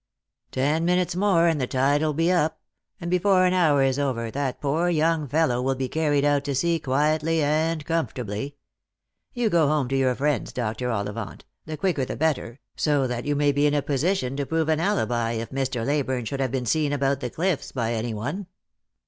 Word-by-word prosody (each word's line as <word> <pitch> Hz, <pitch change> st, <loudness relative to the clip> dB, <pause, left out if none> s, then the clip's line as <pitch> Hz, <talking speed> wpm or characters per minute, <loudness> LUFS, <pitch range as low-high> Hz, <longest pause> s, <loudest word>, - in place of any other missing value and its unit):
Ten 145 Hz, +5 st, +1 dB
minutes 180 Hz, 0 st, +1 dB
more, 185 Hz, -3 st, +3 dB
and 160 Hz, -4 st, +1 dB
the 125 Hz, -, 0 dB
tide 135 Hz, +3 st, +2 dB
will 155 Hz, -2 st, 0 dB
be 165 Hz, +3 st, +2 dB
up; 160 Hz, -3 st, +1 dB, 0.4 s
and 170 Hz, 0 st, -4 dB
before 185 Hz, 0 st, +3 dB
an 180 Hz, -, +2 dB
hour 155 Hz, -7 st, +3 dB
is 135 Hz, +1 st, +1 dB
over, 120 Hz, -5 st, -1 dB
that 135 Hz, -1 st, -3 dB
poor 155 Hz, +5 st, 0 dB
young 160 Hz, -2 st, +1 dB
fellow 135 Hz, -3 st, +1 dB
will 135 Hz, +1 st, 0 dB
be 130 Hz, 0 st, -2 dB
carried 145 Hz, 0 st, +1 dB
out 145 Hz, -1 st, +2 dB
to 140 Hz, -1 st, -1 dB
sea 170 Hz, +4 st, +1 dB
quietly 155 Hz, +3 st, +1 dB
and 155 Hz, +1 st, 0 dB
comfort 165 Hz, -3 st, -1 dB
ably. 120 Hz, +4 st, -4 dB, 0.8 s
You 245 Hz, -2 st, 0 dB
go 165 Hz, -3 st, +4 dB
home 150 Hz, -3 st, +1 dB
to 135 Hz, -, 0 dB
your 130 Hz, -2 st, +2 dB
friends, 145 Hz, -1 st, -1 dB
Dr. 120 Hz, +1 st, -2 dB
Ollivant, 105 Hz, -1 st, -4 dB, 0.2 s
the 155 Hz, -1 st, -5 dB
quicker 180 Hz, -7 st, 0 dB
the -, -, -4 dB
better, 145 Hz, -5 st, -1 dB, 0.2 s
so 145 Hz, -3 st, +1 dB
that 120 Hz, -1 st, -3 dB
you 145 Hz, 0 st, 0 dB
may 145 Hz, 0 st, +3 dB
be 145 Hz, +1 st, +2 dB
in 145 Hz, -, +1 dB
a 145 Hz, -, +1 dB
position 145 Hz, -2 st, 0 dB
to 140 Hz, -, -1 dB
prove 160 Hz, -1 st, 0 dB
an 155 Hz, -1 st, +2 dB
alibi 120 Hz, -, 0 dB
if 115 Hz, 0 st, -4 dB
Mr. 130 Hz, -3 st, -2 dB
Leyburne 130 Hz, -4 st, -1 dB
should 135 Hz, +5 st, -4 dB
have 130 Hz, -3 st, 0 dB
been 130 Hz, -2 st, -2 dB
seen 145 Hz, +4 st, +1 dB
about 140 Hz, -1 st, +1 dB
the 125 Hz, -3 st, -3 dB
cliffs 160 Hz, -1 st, -2 dB
by 120 Hz, -3 st, -1 dB
any 115 Hz, 0 st, -2 dB
one." 145 Hz, -, -4 dB
145 Hz, 210 wpm, -24 LUFS, 130-160 Hz, 0.8 s, go